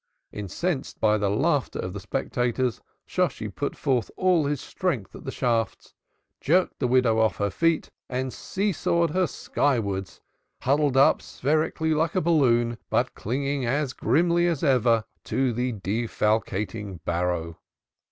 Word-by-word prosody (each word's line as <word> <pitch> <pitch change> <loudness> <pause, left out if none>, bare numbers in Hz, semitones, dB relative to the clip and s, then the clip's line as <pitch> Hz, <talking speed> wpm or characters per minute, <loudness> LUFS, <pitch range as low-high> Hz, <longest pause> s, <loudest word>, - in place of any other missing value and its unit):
Incensed 130 - -3
by 105 -1 +4
the 100 -1 +1
laughter 105 - +1
of 90 - -4
the 100 - -5
spectators, 125 +2 -1 0.2
Shosshi - - -1
put - - -3
forth 125 -5 0
all 180 -5 +3
his 145 -1 -1
strength 135 - -3
at - - -11
the 135 - -3
shafts, 115 -4 -1 0.5
jerked 180 +5 +2
the 125 - +1
widow 125 -3 +3
off 110 -2 +3
her 100 -1 0
feet 165 - +1 0.2
and 130 0 -2
see 200 +2 -1
sawed 170 -1 +1
her 185 +1 +2
sky 140 -3 0
wards, 100 -3 -4 0.4
huddled 140 0 +2
up 135 - +5
spherically 155 +3 0
like 160 +3 0
a - - +4
balloon, 120 -8 +2
but - - +1
clinging 140 +4 -2
as 140 +1 0
grimly 175 +3 +2
as 165 -4 -1
ever 120 -6 +3 0.2
to 130 -2 0
the 125 +2 -1
defalcating 105 -2 -1
barrow. 85 -1 -1
125 Hz, 145 wpm, -25 LUFS, 110-150 Hz, 0.5 s, up